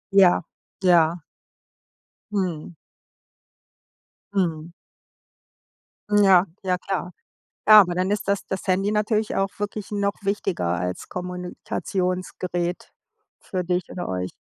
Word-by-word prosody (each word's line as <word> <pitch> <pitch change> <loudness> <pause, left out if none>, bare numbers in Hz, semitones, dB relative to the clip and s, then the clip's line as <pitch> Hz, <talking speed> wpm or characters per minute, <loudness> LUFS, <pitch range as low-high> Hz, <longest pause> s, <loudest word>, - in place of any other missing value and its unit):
Ja, 185 -3 +6 0.4
ja. 175 -2 +4 1.1
Mhm. 180 -4 -2 1.6
Mhm. 170 -4 -1 1.4
Ja, 195 -3 +6 0.2
ja, 185 -1 +1
klar. 180 -1 -3 0.6
Ja, 215 0 +11
aber 180 -3 +2
dann 185 +2 0
ist 205 -1 -2
das 200 -1 +1
das 190 - -4
Handy 195 +2 +2
natürlich 215 0 0
auch 195 0 +1
wirklich 205 0 -4
noch 200 -1 0
wichtiger 195 - -1
als 90 +1 -4
Kommunikationsgerät 180 0 -3 0.5
für 185 -2 -3
dich 180 +1 -1
oder 180 - -5
euch. 90 0 -3
185 Hz, 105 wpm, -24 LUFS, 175-200 Hz, 1.6 s, Ja